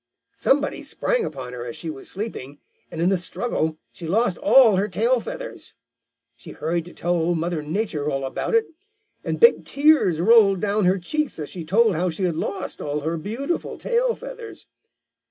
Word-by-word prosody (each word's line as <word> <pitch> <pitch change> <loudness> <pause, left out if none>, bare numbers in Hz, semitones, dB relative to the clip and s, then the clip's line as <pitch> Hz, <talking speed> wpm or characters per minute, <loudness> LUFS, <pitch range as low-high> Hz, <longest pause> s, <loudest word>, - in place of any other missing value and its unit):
Somebody 290 +1 +1
sprang - - -1
upon 130 -4 -6
her 120 -1 -6
as 120 -1 -6
she 165 - -5
was 135 -3 -9
sleeping, 185 - -6 0.3
and 160 - -7
in 170 +2 +3
the 195 - +2
struggle 165 -4 -2
she 170 - -9
lost 210 +2 +1
all 260 -8 +6
her 200 +2 +1
tail 230 +6 +1
feathers. - - -8 0.6
She 115 - -11
hurried 165 +1 -2
to 175 - -12
tell 175 +1 -1
Old 170 0 +1
Mother 165 -1 -2
Nature 155 -2 -2
all 135 -1 -2
about 135 - -2
it, 455 -1 +4 0.6
and - - -3
big 470 +1 +6
tears 280 - +3
rolled 200 0 +5
down 205 +1 +1
her 185 +2 +3
cheeks 305 - -2
as 150 -2 -6
she 175 - -6
told 210 +6 +3
how 180 +2 0
she 170 +3 -4
had 175 -3 +1
lost 180 - -4
all 150 0 -2
her 160 +3 -2
beautiful 230 - -3
tail 480 0 +1
feathers. 485 -2 -9
185 Hz, 185 wpm, -23 LUFS, 160-245 Hz, 0.6 s, all